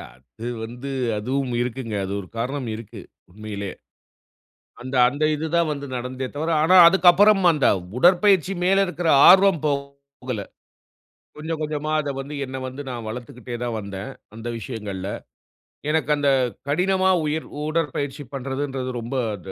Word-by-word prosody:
அது 70 - -11 0.2
வந்து, 120 +4 -7 0.3
அதுவும் 130 +4 -2
இருக்குங்க. 120 -2 -4
அது 95 - -6
ஒரு 90 - -12
காரணம் 130 +2 -3
இருக்கு 110 -2 -10 0.3
உண்மையிலே. 100 -1 -6 1.1
அந்த 130 +2 -7
அந்த 145 +4 -5
இது 155 +2 -3
தா 170 - +4
வந்து 140 -1 -6
நடந்ததே 130 +1 -4
தவிர 160 +3 -2
ஆனா, 185 +4 +5
அதுக்கப்புறம் 190 +3 +5
அந்த 150 -3 +1 0.3
உடற்பயிற்சி 185 +2 +4
மேல 195 +2 +4
இருக்கிற 175 -1 -3 0.2
ஆர்வம் 190 -2 +6
போ 150 - +2 0.5
போகல. 125 -5 -3 0.9
கொஞ்சம் 160 +1 -4
கொஞ்சமா 150 0 -3
அத 145 -2 -3
வந்து 140 +2 -7
என்ன 130 0 -6
வந்து 130 +3 -7
நான் 120 -3 -6
வளர்திக்கிட்டே 120 +1 -7
தான் 120 -2 -2
வந்த 100 -1 -8 0.4
அந்த 115 +1 -7
விஷயங்கள்ல. 105 -5 -6 0.8
எனக்கு 155 -2 0
அந்த 145 -1 +2 0.4
கடினமா 185 +5 +2 0.2
உயிர் 155 +1 -2 0.2
உடற்பயிற்சி 145 -3 -2
பண்றதுங்கறது 135 -1 -3
ரொம்ப 120 +4 -5 0.2
அ 100 - -5
135 Hz, 140 wpm, -23 LUFS, 120-160 Hz, 1.1 s, ஆர்வம்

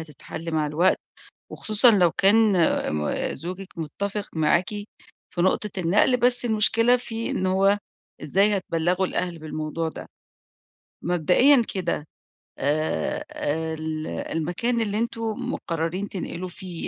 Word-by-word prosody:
هتتحِلّ 160 +2 -8
مع 155 -1 +1
الوقت، 165 +6 +2 0.5
وخصوصًا 215 +3 +4
لو 180 -5 +4
كان 210 +2 +4 0.4
م 75 0 -1
زوجِك 185 +5 -7
متَّفق 200 +6 -4
معاكِ 170 +3 +2 0.6
في 175 - -2
نقطة 205 +3 +1
النقل. 185 +8 +3
بس 245 0 +3
المشكلة 230 +2 +4
في 230 -2 -5
إن 185 - -1
هو 195 +2 +3 0.4
إزاي 200 +7 +2
هتبلّغوا 180 +1 0
الأهل 175 -2 -3
بالموضوع 155 +1 -4
ده. - - -9 0.9
مبدئيًا 180 - +4
كده 175 -5 -2 0.5
آآ، 150 - -1 0.6
ال 155 0 -3
المكان 180 +9 -2
اللي 210 -1 -1
أنتم 230 -1 -3
مقررين 165 +4 -3
تنقلوا 185 -1 -5
فيه، 180 -2 -7
185 Hz, 115 wpm, -24 LUFS, 165-210 Hz, 0.9 s, وخصوصًا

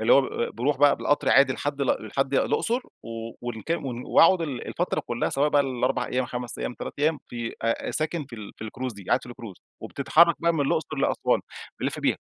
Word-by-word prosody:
اللي 110 +2 +4
هو 140 - +8
ب - - -2
ب 120 - -3
بيروح 135 +4 +1
بقى 145 +1 +5
بالقطْر 145 - +1
عادي 135 -1 +6
لحد 145 +1 -3
ال 130 -5 0
لحد 135 +4 -1
الأُقْصُر 235 - +1 0.2
و - - -11 0.3
والك 120 +4 -6
ون 125 -3 -4
وأقعُد 180 +1 +6
ال 135 -6 -4
الفترة 175 - -1
كُلّها 120 0 -2
سواء 145 +2 +2
بقى 145 -1 +4
ال4 130 0 -1
أيام 125 -1 -1
5 125 0 -5
أيام - - -3
3 - - -6
أيام 155 0 +2
في 120 -1 -5
أ 115 0 -1
ساكن 155 0 -1
في 125 - -10
ال 105 -2 -9
في - - -8
الCruise 125 +2 -5
دي، 100 -2 -11
قاعد 125 - +2
في - - -11
الCruise 115 -6 -10 0.2
وبتتحرك 165 +4 +4
بقى 170 0 +3
من 150 - 0
الأُقْصُرلأسوان 155 -1 +1 0.4
بنلف - - -2
بيها. - - +1
135 Hz, 215 wpm, -26 LUFS, 120-145 Hz, 0.4 s, هو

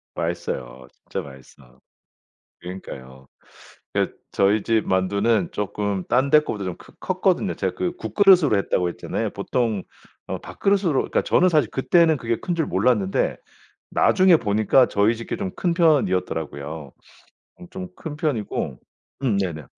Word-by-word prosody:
맛있어요. 65 0 -4
진짜 - - -6
맛있어. 65 -2 -16 0.8
그러니까요. 65 -8 -10 0.7
그러니까 - - -1 0.2
저희 100 +1 +3
집 110 -1 +1
만두는 100 +2 +1
쪼끔 100 -2 -2
딴 130 +2 +2
데 150 0 +7
거보다 105 -9 -5
좀 90 -2 -4
크 - - -17
컸거든요. - - 0
제가 95 -2 -2
그 175 - -3
국그릇으로 180 - +4
했다고 90 -2 0
했잖아요. - - -3
보통 115 -6 -1 0.4
어 - - -4
밥그릇으로 195 -5 0
그러니까 - - 0
저는 185 - +3
사실 155 -4 +2
그때는 160 +3 +3
그게 115 -1 -1
큰 175 - -2
줄 160 -3 0
몰랐는데 100 -1 +1 0.6
나중에 185 -3 +5
보니까 110 +3 +3
저희 105 +4 +2
집 115 - -9
게 - - -3
좀 195 -2 -3
큰 175 -2 0
편이었더라고요. 80 - 0 0.7
음 180 - -10
좀 185 -1 -7
큰 150 -3 -7
편이고 145 - -2 0.4
음 115 -7 +1
네네. 85 -7 -3
105 Hz, 325 characters per minute, -23 LUFS, 90-155 Hz, 0.8 s, 데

